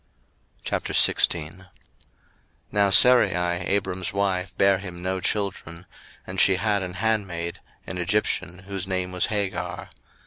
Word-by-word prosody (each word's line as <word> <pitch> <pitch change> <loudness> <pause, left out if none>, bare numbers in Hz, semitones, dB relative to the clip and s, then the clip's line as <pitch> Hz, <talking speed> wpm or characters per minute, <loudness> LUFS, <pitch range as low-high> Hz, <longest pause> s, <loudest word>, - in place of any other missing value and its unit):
01:016:001 85 +3 +1 1.0
Now 100 -1 +2
Sarai 125 +2 +6
Abram's 90 +1 -1
wife 95 -2 -1
bare 95 -1 +4
him 90 -3 -8
no 95 0 -1
children: 90 -5 -3 0.4
and 95 0 -1
she 95 - +5
had 105 +1 0
an 90 -1 -5
handmaid, 95 -6 -2 0.3
an 90 - -6
Egyptian, 90 -1 -1
whose 95 -2 -4
name 90 -1 -2
was 90 0 0
Hagar. 100 -3 -3
95 Hz, 115 wpm, -24 LUFS, 90-100 Hz, 1.0 s, Sarai